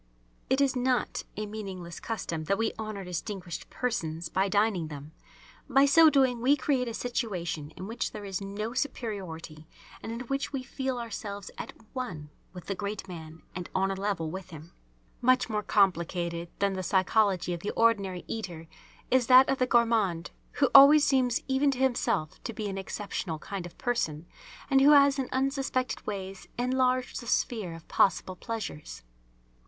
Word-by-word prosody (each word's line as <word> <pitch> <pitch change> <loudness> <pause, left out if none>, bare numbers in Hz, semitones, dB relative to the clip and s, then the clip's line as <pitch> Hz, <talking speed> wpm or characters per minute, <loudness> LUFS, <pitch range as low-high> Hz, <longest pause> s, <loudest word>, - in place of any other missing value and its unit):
It 265 +1 +3
is 275 -1 +2
not 250 -1 0
a 215 - -2
meaningless 195 -5 -7
custom 165 -8 -4
that 195 +5 +1
we 225 - 0
honour 215 -3 -4
distinguished 180 0 -5
persons 165 -9 -2
by 190 +1 +1
dining 200 -4 +1
them. 150 0 -9 0.6
By 270 +1 +5
so 320 +3 +7
doing 260 -5 +2
we 270 +4 +5
create 265 -3 0
a 230 - -4
situation 180 - -3
in 185 - -6
which 225 +4 -3
there 210 -1 -7
is 195 -1 -4
no 205 +3 -4
superiority 185 - -4 0.3
and 225 - -6
in 230 +1 -5
which 275 +3 -2
we 270 -3 -3
feel 260 0 -3
ourselves 205 -4 -6
at - - -6 0.2
one 170 - -5 0.2
with 180 -2 -10
the 195 - -2
great 200 0 -5
man 160 -3 -9
and 180 -1 -6
on 195 +1 +2
a - - 0
level 195 -5 -2
with 190 0 -7
him. 160 0 -11 0.5
Much 250 -1 +3
more 210 -1 0
complicated 170 -4 +1
than 200 -1 +1
the 190 - -3
psychology 190 0 +2
of 170 - -4
the 200 - -4
ordinary 200 -6 +1
eater 175 -7 -5 0.5
is 255 -2 +3
that 255 +1 +8
of 270 - +1
the 255 - +2
gourmand, 225 -8 +2 0.2
who 275 -3 +2
always 285 +2 +9
seems 255 -4 +2
even 270 +2 +2
to 270 - -1
himself 245 -11 0
to 230 - -4
be 215 -1 -4
an 195 -1 -4
exceptional 190 -4 -4
kind 185 +3 -6
of 170 - -16
person 175 - -1 0.4
and 270 -1 +4
who 290 +2 +8
has 280 -1 +6
in 260 - -2
unsuspected 265 -1 -1
ways 195 -2 -5
enlarged 255 +1 +1
the 235 - -10
sphere 210 -8 0
of 165 - -13
possible 185 0 +2
pleasures. 215 - -6
210 Hz, 170 wpm, -29 LUFS, 180-255 Hz, 0.6 s, always